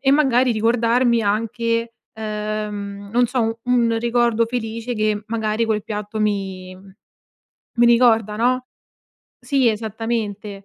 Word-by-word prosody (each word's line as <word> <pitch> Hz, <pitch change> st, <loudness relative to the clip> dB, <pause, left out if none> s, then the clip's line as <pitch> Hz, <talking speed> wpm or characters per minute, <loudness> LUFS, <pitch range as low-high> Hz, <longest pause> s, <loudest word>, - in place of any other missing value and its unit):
e 270 Hz, -, +2 dB
magari, 260 Hz, -3 st, +3 dB
ricordarmi 230 Hz, +1 st, +2 dB
anche, 230 Hz, +2 st, -1 dB, 0.2 s
uhm, 210 Hz, -2 st, -4 dB
non 245 Hz, 0 st, +3 dB
so 250 Hz, 0 st, 0 dB, 0.2 s
u 250 Hz, -, -4 dB
un 235 Hz, -2 st, +3 dB
ricordo 235 Hz, -1 st, +2 dB
felice 230 Hz, 0 st, -4 dB
che, 215 Hz, -1 st, 0 dB
magari, 220 Hz, 0 st, -1 dB
quel 215 Hz, -2 st, -1 dB
piatto 210 Hz, 0 st, -5 dB
mi 190 Hz, -3 st, -2 dB, 1.0 s
mi 240 Hz, -, +5 dB
ricorda, 230 Hz, -3 st, +4 dB
no? 255 Hz, +3 st, +1 dB, 0.7 s
Sì. 270 Hz, -4 st, +2 dB
Esattamente. 215 Hz, -2 st, -3 dB
225 Hz, 120 wpm, -21 LUFS, 210-240 Hz, 1.0 s, mi